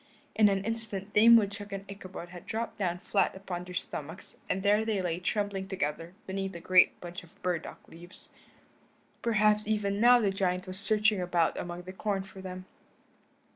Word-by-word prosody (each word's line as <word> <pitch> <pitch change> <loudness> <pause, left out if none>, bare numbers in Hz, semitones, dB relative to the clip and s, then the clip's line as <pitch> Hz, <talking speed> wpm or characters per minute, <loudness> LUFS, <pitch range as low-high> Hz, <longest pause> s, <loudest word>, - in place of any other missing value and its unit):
In 215 -1 +6
an 195 -1 0
instant 215 -3 -3
Dame 230 +2 +8
Woodchuck 205 -1 +1
and 195 0 -5
Ichabod 190 -3 -8
had 175 0 -11
dropped 225 0 -4
down 175 -3 0
flat 200 +1 0
upon 185 -2 -5
their 180 0 -9
stomachs 165 -2 -6
and 190 - -1
there 210 +2 +4
they 220 -3 0
lay 175 -2 -1
trembling 195 0 -2
together 165 -1 -3
beneath 195 0 -4
a - - -6
great 180 +1 +4
bunch 175 +1 -7
of 170 - -20
burdock 180 -3 -3
leaves. 175 +2 -6 0.9
Perhaps 210 -2 +3
even 205 -1 0
now 245 +1 +7
the 205 -4 +2
giant 180 -2 -1
was 185 0 -5
searching 210 -1 +3
about 175 -2 +1
among 175 0 -5
the 185 +1 -8
corn 195 0 -2
for 190 -1 -12
them. 185 0 -7
195 Hz, 175 wpm, -30 LUFS, 180-210 Hz, 0.9 s, Dame